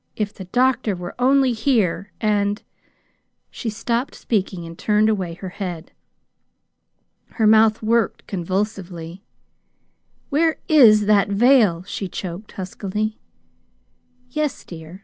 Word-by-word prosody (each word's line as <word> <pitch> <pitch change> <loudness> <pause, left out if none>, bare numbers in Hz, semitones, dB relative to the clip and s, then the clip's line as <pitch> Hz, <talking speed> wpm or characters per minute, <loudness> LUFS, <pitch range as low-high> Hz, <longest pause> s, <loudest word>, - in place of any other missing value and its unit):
If 210 -1 -2
the 190 - -9
doctor 245 +1 +1
were 175 0 -7
only 265 0 +3
here, 220 -6 0
and 205 -1 0 0.4
" - - -47
She 235 - -4
stopped 235 +5 -2
speaking 190 -5 -2
and 165 0 -9
turned 210 +4 +2
away 185 -6 -2
her 185 +2 -7
head. 180 -3 -6 1.4
Her 220 - +1
mouth 220 0 +5
worked 225 0 +1
convulsively. 185 -2 -4 1.1
"Where 320 +3 +2
is 225 -9 +6
that 205 -1 +4
veil?" 205 -5 +4
she 195 0 -5
choked 185 +3 -7
huskily. 205 +3 -4 1.1
"Yes, 300 0 -2
dear. 165 +1 -10
210 Hz, 115 wpm, -21 LUFS, 185-230 Hz, 1.4 s, is